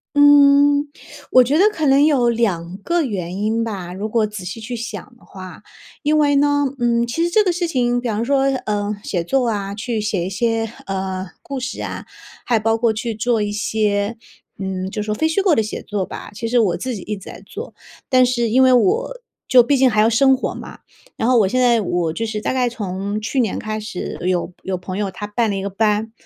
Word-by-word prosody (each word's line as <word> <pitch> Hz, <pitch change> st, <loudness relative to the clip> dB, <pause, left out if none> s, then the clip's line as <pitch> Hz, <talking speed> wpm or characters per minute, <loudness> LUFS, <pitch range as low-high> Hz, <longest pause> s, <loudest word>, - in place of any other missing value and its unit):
嗯， 285 Hz, 0 st, +6 dB, 0.4 s
我 255 Hz, -, +7 dB
觉 275 Hz, +5 st, +1 dB
得 385 Hz, -, +5 dB
可 315 Hz, -6 st, -2 dB
能 275 Hz, +2 st, +5 dB
有 260 Hz, -6 st, +3 dB
2 190 Hz, -6 st, -1 dB
个 340 Hz, +10 st, 0 dB
原 185 Hz, -6 st, -4 dB
因 220 Hz, +2 st, 0 dB
吧， 190 Hz, -6 st, -5 dB
如 205 Hz, +3 st, -4 dB
果 225 Hz, -1 st, +2 dB
仔 210 Hz, -3 st, -7 dB
细 190 Hz, +5 st, -6 dB
去 240 Hz, +3 st, -6 dB
想 240 Hz, +2 st, -7 dB
的 -, -, -24 dB
话。 185 Hz, -2 st, -11 dB, 0.4 s
因 305 Hz, 0 st, +2 dB
为 290 Hz, -1 st, +3 dB
呢， 285 Hz, 0 st, +3 dB
嗯， 235 Hz, -1 st, +2 dB
其 280 Hz, +8 st, -1 dB
实 345 Hz, -, +1 dB
这 425 Hz, +4 st, +4 dB
个 370 Hz, -, +1 dB
事 345 Hz, 0 st, -1 dB
情， 245 Hz, -5 st, +1 dB
比 245 Hz, -, -3 dB
方 215 Hz, +1 st, -1 dB
说， 275 Hz, +1 st, +2 dB, 0.3 s
呃， 205 Hz, 0 st, -1 dB
写 175 Hz, -3 st, -2 dB
作 250 Hz, +8 st, +1 dB
啊， 200 Hz, -2 st, -3 dB
去 220 Hz, +1 st, -3 dB
写 205 Hz, -4 st, -1 dB
一 -, -, -3 dB
些， 225 Hz, +2 st, -1 dB
呃， 190 Hz, -1 st, -3 dB, 0.2 s
故 275 Hz, -2 st, -5 dB
事 260 Hz, +2 st, -5 dB
啊， -, -, -5 dB, 0.4 s
还 235 Hz, -, +2 dB
包 225 Hz, +1 st, +1 dB
括 230 Hz, 0 st, +2 dB
去 230 Hz, +1 st, -3 dB
做 225 Hz, +1 st, 0 dB
一 205 Hz, 0 st, -1 dB
些 210 Hz, +1 st, -1 dB, 0.4 s
嗯， 190 Hz, -1 st, -4 dB
就 210 Hz, +1 st, -4 dB
说 210 Hz, 0 st, -2 dB
非 315 Hz, +9 st, +1 dB
虚 325 Hz, +5 st, +1 dB
构 385 Hz, -4 st, +3 dB
的 225 Hz, -, +3 dB
写 215 Hz, -, -5 dB
作 205 Hz, -3 st, -3 dB
吧， -, -, -9 dB
其 230 Hz, -, -4 dB
实 245 Hz, +2 st, +1 dB
我 195 Hz, -6 st, +2 dB
自 255 Hz, -2 st, -4 dB
己 195 Hz, -, -7 dB
一 210 Hz, -, -4 dB
直 195 Hz, -, -11 dB
在 -, -, -11 dB
做。 -, -, -8 dB, 0.3 s
但 255 Hz, -1 st, +5 dB
是 240 Hz, -2 st, 0 dB
因 260 Hz, +4 st, +4 dB
为 260 Hz, -1 st, +5 dB
我 485 Hz, -, +1 dB, 0.3 s
就 250 Hz, -1 st, +7 dB
毕 275 Hz, +4 st, +2 dB
竟 260 Hz, -1 st, +5 dB
还 215 Hz, -1 st, +3 dB
要 220 Hz, -, +4 dB
生 265 Hz, +4 st, +4 dB
活 260 Hz, -, -3 dB
嘛， -, -, -9 dB
嗯， -, -, -20 dB, 0.4 s
然 225 Hz, -, 0 dB
后 255 Hz, -, +4 dB
我 205 Hz, -, +4 dB
现 255 Hz, +7 st, 0 dB
在 235 Hz, -3 st, +4 dB
我 175 Hz, -3 st, -1 dB
就 225 Hz, +7 st, -3 dB
是 215 Hz, -1 st, -4 dB
大 -, -, -1 dB
概 255 Hz, -1 st, +1 dB
从 205 Hz, -1 st, -4 dB
去 255 Hz, +5 st, -2 dB
年 225 Hz, -6 st, 0 dB
开 215 Hz, -1 st, -4 dB
始， 210 Hz, -4 st, -6 dB
有 180 Hz, -1 st, -1 dB
有 190 Hz, -1 st, -2 dB
朋 185 Hz, +1 st, -6 dB
友 200 Hz, -2 st, -2 dB
他 205 Hz, +3 st, -6 dB
办 220 Hz, +1 st, 0 dB
了 200 Hz, -, -1 dB
一 195 Hz, -, -3 dB
个 200 Hz, -, -3 dB
班。 215 Hz, +2 st, 0 dB
225 Hz, 250 characters per minute, -20 LUFS, 205-255 Hz, 0.4 s, 我